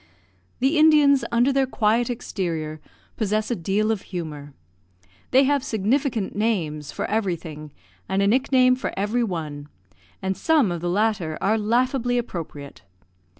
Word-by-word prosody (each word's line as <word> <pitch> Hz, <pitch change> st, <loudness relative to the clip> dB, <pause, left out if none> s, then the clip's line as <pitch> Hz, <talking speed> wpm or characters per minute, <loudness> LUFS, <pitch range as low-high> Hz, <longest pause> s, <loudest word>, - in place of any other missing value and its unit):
The 280 Hz, +5 st, +2 dB
Indians, 300 Hz, -3 st, +5 dB
under 240 Hz, +4 st, +3 dB
their 270 Hz, -1 st, +2 dB
quiet 230 Hz, 0 st, +1 dB
exterior, 165 Hz, -10 st, -4 dB, 0.4 s
possess 215 Hz, +1 st, -1 dB
a -, -, +1 dB
deal 200 Hz, +5 st, 0 dB
of 215 Hz, -3 st, -2 dB
humour. 150 Hz, -6 st, -6 dB, 0.7 s
They 265 Hz, +2 st, +5 dB
have 280 Hz, 0 st, +1 dB
significant 225 Hz, 0 st, -1 dB
names 160 Hz, -10 st, -1 dB
for -, -, -3 dB
everything, 170 Hz, -8 st, -3 dB, 0.4 s
and 190 Hz, -, 0 dB
a -, -, +3 dB
nickname 255 Hz, +2 st, +4 dB
for 255 Hz, -, -4 dB
every 210 Hz, +5 st, 0 dB
one, 150 Hz, -7 st, -5 dB, 0.5 s
and 190 Hz, 0 st, -2 dB
some 285 Hz, -, +2 dB
of 170 Hz, -2 st, -4 dB
the 175 Hz, -, -1 dB
latter 190 Hz, -5 st, 0 dB
are 210 Hz, +3 st, +2 dB
laughably 245 Hz, +3 st, +1 dB
appropriate. 165 Hz, -, -6 dB
215 Hz, 140 wpm, -23 LUFS, 175-250 Hz, 0.7 s, Indians